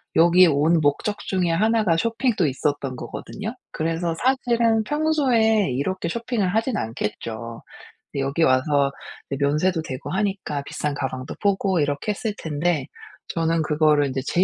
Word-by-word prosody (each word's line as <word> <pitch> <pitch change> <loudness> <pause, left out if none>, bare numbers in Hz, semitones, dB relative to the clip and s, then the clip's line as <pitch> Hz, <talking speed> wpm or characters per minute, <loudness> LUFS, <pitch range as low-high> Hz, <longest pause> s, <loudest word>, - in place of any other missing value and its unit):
여기에 175 +2 +6
온 160 +2 +3
목적 150 +8 0
중에 185 -3 0
하나가 210 0 +2
쇼핑도 230 -1 +1
있었던 140 -1 -1
거거든요. 205 - -6 0.2
그래서 165 +1 -1
사실은 235 -4 +2
평소에 245 - +2
이렇게 170 +7 -2
쇼핑을 230 -1 -1
하진 225 +1 0
않겠죠. 115 +1 -5 0.5
근데 140 - -2
여기 140 +5 0
와서 140 +1 +3 0.4
네 140 - -1
면세도 155 +5 +2
되고 130 -4 -6
하니까 190 -7 -1
비싼 150 -1 -2
가방도 130 -2 -4
보고 195 -2 +1
이렇게 145 +6 0
했을 210 0 -3
텐데 155 -1 -1 0.4
저는 165 -1 0
그거를 150 -2 +3
이제 130 0 -2
제 180 - +3
165 Hz, 325 characters per minute, -23 LUFS, 145-210 Hz, 0.5 s, 여기에